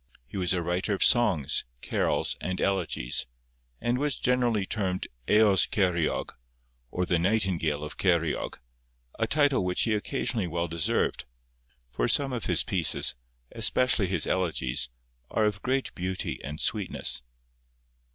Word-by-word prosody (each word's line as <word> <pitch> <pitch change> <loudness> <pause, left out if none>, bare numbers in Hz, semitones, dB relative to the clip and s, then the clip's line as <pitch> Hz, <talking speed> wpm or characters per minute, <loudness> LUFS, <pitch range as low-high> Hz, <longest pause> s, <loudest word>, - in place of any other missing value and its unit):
He - - -13
was 90 -2 0
a 90 -2 0
writer 90 +4 -1
of - - +2
songs, 105 - +3 0.2
carols, - - 0
and 95 0 -3
elegies, 90 -13 0 0.5
and 120 +1 0
was 145 -2 0
generally 120 -5 +1
termed 95 -3 -2 0.2
Eos 105 -4 +5
Ceiriog, 90 -5 0 0.6
or 90 +6 -1
the 85 -1 +1
Nightingale 85 -6 0
of 75 - -7
Ceiriog, 85 -4 0 0.6
a - - +1
title 145 -7 +2
which 90 0 0
he 110 - +1
occasionally 110 -2 -1
well 85 +1 -2
deserved, 85 -1 -1 0.7
for - - 0
some 135 -2 +3
of 120 - -3
his - - +3
pieces, 90 -5 +2 0.4
especially 125 -6 +3
his 90 -4 0
elegies, 80 -10 0 0.4
are 110 - +1
of 105 -1 -1
great 130 +1 -1
beauty 90 +1 -4
and 75 +2 -6
sweetness. 100 - 0
95 Hz, 135 wpm, -27 LUFS, 85-110 Hz, 0.7 s, Eos